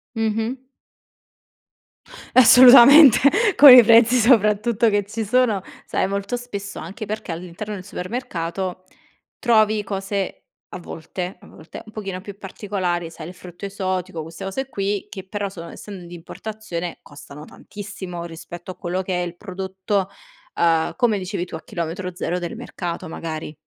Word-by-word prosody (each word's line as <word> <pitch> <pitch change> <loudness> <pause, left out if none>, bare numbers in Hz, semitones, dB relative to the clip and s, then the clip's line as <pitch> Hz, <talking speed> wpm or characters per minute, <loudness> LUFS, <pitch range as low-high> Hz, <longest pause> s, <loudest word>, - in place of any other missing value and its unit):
Mh-mh. 225 +3 -1 1.8
Assolutamente 255 +2 +9 0.4
con 285 -2 +11
i 250 - +10
prezzi 230 +2 +6
soprattutto 225 -1 +3
che 205 -1 +1
ci 220 +2 -4
sono. 225 -3 +2 0.2
Sai - - -1
molto 200 +4 -3
spesso, 200 -5 -7
anche 195 +6 -7
perché 210 -4 -5
all'interno 180 +5 -7
del 185 - -7
supermercato, 185 -3 -5 0.5
trovi 215 -3 +2
cose, 195 -1 -4 0.2
a - - -8
volte, 175 +2 -7
a - - -16
volte, 160 - -12
un 215 - -13
pochino 195 -4 -6
più 200 0 -10
particolari: 185 -4 -3
sai 160 -1 -9
il 180 - -9
frutto 180 +1 -10
esotico 185 -4 -3
queste 165 +4 -9
cose 265 +8 -4
qui, 200 -1 -3
che 190 -2 -9
però 205 0 -3
sono 170 -3 -10
essendo 195 -4 -10
di 175 - -12
importazione 180 0 -7
costano 145 0 -12
tantissimo 190 -2 -9
rispetto 170 +2 -9
a - - -11
quello 180 +1 -3
che 180 -1 -2
è 175 - -2
il 175 - -7
prodotto, 190 0 -3 0.5
ehm, 165 -1 +2
come 235 -5 +2
dicevi 190 -1 -4
tu, 170 - -9
a 160 - -8
chilometro 180 -1 -5
0 180 0 -2
del 175 +5 -5
mercato, 180 -7 -6
magari. 155 -2 -6
195 Hz, 150 wpm, -21 LUFS, 175-215 Hz, 1.8 s, con